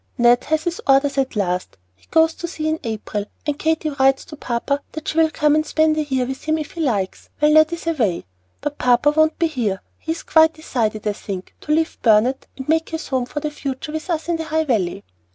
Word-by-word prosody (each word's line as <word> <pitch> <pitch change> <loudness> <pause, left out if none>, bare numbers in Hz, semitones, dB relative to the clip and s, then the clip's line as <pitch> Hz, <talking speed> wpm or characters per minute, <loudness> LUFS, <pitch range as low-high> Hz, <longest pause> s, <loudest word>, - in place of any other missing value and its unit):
"Ned 240 0 +4
has 315 0 0
his 345 0 -3
orders 275 +1 +4
at 265 -2 -1
last. 180 - -2 0.2
He 90 - -28
goes 320 0 +4
to 345 - -6
sea 315 -2 -4
in 315 0 0
April, 215 -2 -3 0.2
and 295 -1 -2
Katy 320 -1 0
writes 270 -1 +2
to 300 - -10
papa 280 +2 -2
that 315 0 -7
she 320 - 0
will 320 -1 +5
come 300 -1 +2
and 310 0 +3
spend 315 0 +2
a 310 - +1
year 265 -3 0
with 265 +1 -6
him 315 0 +1
if 305 -2 -5
he 335 - -5
likes, 205 -10 -1
while 300 0 +4
Ned 310 +1 +6
is 340 -1 -5
away. 240 - 0 0.4
But 295 0 -4
papa 250 +4 +4
won't 315 +1 +2
be 335 - +2
here. 235 -11 -1 0.2
He 320 - -4
has 330 - -9
quite 320 0 +5
decided, 220 -8 -2
I 210 - +1
think, 195 -2 -7
to 300 - -4
leave 320 +1 0
Burnet 230 +4 +3
and 265 - -7
make 320 +1 +1
his 320 -1 -5
home 255 -2 0
for 295 - -4
the 300 - -2
future 275 0 -5
with 315 +3 -5
us 325 -2 -1
in 340 -1 0
the 325 - -4
High 315 +1 +1
Valley. 200 - -1
295 Hz, 240 wpm, -21 LUFS, 245-315 Hz, 0.4 s, Ned